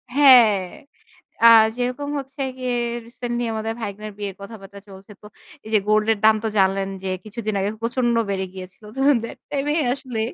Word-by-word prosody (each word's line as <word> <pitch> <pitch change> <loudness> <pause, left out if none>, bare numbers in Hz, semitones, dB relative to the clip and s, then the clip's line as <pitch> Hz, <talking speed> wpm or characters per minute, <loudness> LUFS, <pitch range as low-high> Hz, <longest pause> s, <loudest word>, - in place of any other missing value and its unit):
হ্যাঁ, 250 -7 +7 0.9
আ - - +11 0.3
যেরকম 250 +4 -3
হচ্ছে 270 +1 -9 0.2
গিয়ে 250 -1 -2 0.3
রিসেন্টলি 240 0 -4
আমাদের 220 +1 -3
ভাইগনার 210 0 -6
বিয়ের 200 -2 -5
কথাবার্তা 200 -1 -11
চলছে। 195 +2 -13
তো - - -16 0.4
এই - - -9
যে 215 - +5
গোল্ড 215 0 +2
এর - - -8
দাম 220 0 +6
তো - - 0
জানলেন 195 0 +2 0.2
যে 190 - -3 0.2
কিছুদিন 215 0 -4
আগে 195 +1 0
প্রচন্ড 240 0 0
বেড়ে 190 -1 -2
গিয়েছিল। 185 +2 -11
তো - - -6 0.2
দ্যাট 230 - -7
টাইমে 290 +1 -1 0.2
আসলে 260 -5 -6
220 Hz, 170 wpm, -22 LUFS, 200-250 Hz, 0.9 s, আ